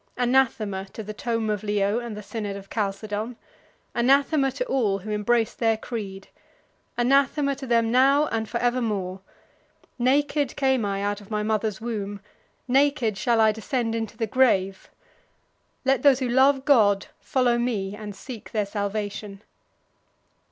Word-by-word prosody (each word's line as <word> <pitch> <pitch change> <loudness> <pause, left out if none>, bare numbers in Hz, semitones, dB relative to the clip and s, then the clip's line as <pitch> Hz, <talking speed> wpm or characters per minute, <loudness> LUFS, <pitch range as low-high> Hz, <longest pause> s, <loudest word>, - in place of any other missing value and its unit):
Anathema 235 -6 +1
to 220 - -6
the 215 +1 -6
tome 230 0 -2
of 210 - -2
Leo 205 +1 0
and 235 -3 -6
the 210 - -7
synod 205 -2 -5
of 195 0 -10
Chalcedon! 210 +2 -3 0.6
Anathema 275 +3 +3
to - - -2
all 230 - +1
who 205 +2 -7
embrace 220 +2 +1
their 225 -2 +1
creed! 200 -5 -6 0.7
Anathema 275 +3 +2
to 270 -1 -7
them 230 -1 +2
now 275 +4 +4
and 220 -1 -2
forevermore! 225 -6 -1 0.8
Naked 285 +2 +1
came 265 -5 +1
I 200 0 -2
out 205 0 -2
of 200 - -15
my 210 -1 -1
mother's 215 -1 -1
womb, 205 -3 -4 0.5
naked 270 -4 +2
shall 230 +3 +1
I 220 -1 +5
descend 225 +2 -2
into 225 -1 -4
the 225 - 0
grave. 200 -5 +1 1.0
Let 270 -1 +3
those 280 -3 +6
who 260 -1 -2
love 265 +2 +4
God 205 -8 +4
follow 245 -2 +1
me 205 -5 -2
and 210 -1 -8
seek 240 -2 -9
their 210 -2 +1
salvation." 205 0 -4
225 Hz, 145 wpm, -25 LUFS, 205-255 Hz, 1.0 s, those